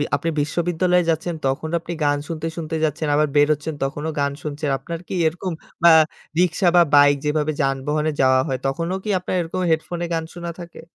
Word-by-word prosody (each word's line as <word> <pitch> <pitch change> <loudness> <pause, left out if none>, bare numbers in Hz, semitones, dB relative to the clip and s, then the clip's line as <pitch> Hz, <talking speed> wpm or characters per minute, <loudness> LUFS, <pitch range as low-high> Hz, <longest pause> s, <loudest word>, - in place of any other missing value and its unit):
আপনি 165 +3 -2
বিশ্ববিদ্যালয়ে 175 +3 +1
যাচ্ছেন, 165 +2 0
তখন 135 +4 -2
আপনি 170 +1 -6
গান 145 0 +2
শুনতে, 165 -1 -4
শুনতে 160 -1 -4
যাচ্ছেন, 150 0 -2
আবার 150 0 +3
বেরোচ্ছেন 150 +1 +2
তখনও 150 +3 -3
গান 140 0 +1
শুনছেন। 150 0 -3
আপনার 170 +2 -6
কি - - -6
এরকম 175 +2 -3 0.3
আ - - +10 0.5
রিক্সা 180 +1 +2
বা 175 - +8
বাইক 145 0 +6
যেভাবে 150 0 +1
যানবাহনে 150 +3 0
যাওয়া 130 0 +4
হয়, 135 -3 -1
তখনও 165 +7 -2
কি 215 - -5
আপনার 180 - -3
এরকম 170 +2 -4
হেডফোনে 170 +2 -1
গান 165 -1 -1
শোনা 170 -1 -5
থাকে? 170 -1 -10
160 Hz, 180 wpm, -21 LUFS, 145-170 Hz, 0.5 s, আ